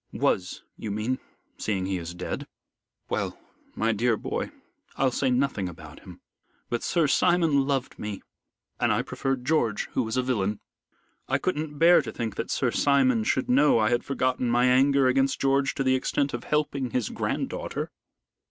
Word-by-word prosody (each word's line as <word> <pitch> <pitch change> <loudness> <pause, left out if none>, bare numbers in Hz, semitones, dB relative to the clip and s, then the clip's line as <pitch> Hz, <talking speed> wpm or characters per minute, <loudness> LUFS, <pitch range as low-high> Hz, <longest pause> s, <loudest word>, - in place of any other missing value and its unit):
"Was, 90 -1 0
you 110 - -5
mean, 110 +5 -1 0.4
seeing 95 -4 -1
he 95 -1 -1
is 85 +1 -7
dead. 90 - -5 0.6
Well, - - -2 0.4
my 115 +1 +1
dear 115 +1 +1
boy, - - -3 0.5
I'll 135 -1 +2
say 130 +2 0
nothing 125 -7 0
about 85 - -11
him. - - -13 0.5
But 120 - 0
Sir 170 -3 +1
Simon 150 -2 +3
loved 135 -2 -2
me 105 -2 -5 0.6
and - - +2
I - - +1
preferred 135 -2 -3
George, 120 -9 +1
who - - 0
was 110 0 -2
a 130 - +2
villain. 105 -5 -1 0.7
I - - +2
couldn't 155 -4 -3
bear 170 +3 +6
to - - -6
think 115 -3 -4
that - - -3
Sir - - +1
Simon 130 -5 +3
should 130 +4 0
know 140 +3 +5
I 110 0 +2
had 120 - +1
forgotten 130 -2 0
my 120 +1 +3
anger 135 +2 +4
against 135 +1 +2
George 135 +1 +2
to 135 - 0
the 130 -1 +3
extent 140 +2 0
of 120 0 -5
helping 145 -4 0
his 120 -2 -1
grand - - -2
daughter. - - -4
130 Hz, 175 wpm, -26 LUFS, 110-140 Hz, 0.7 s, bear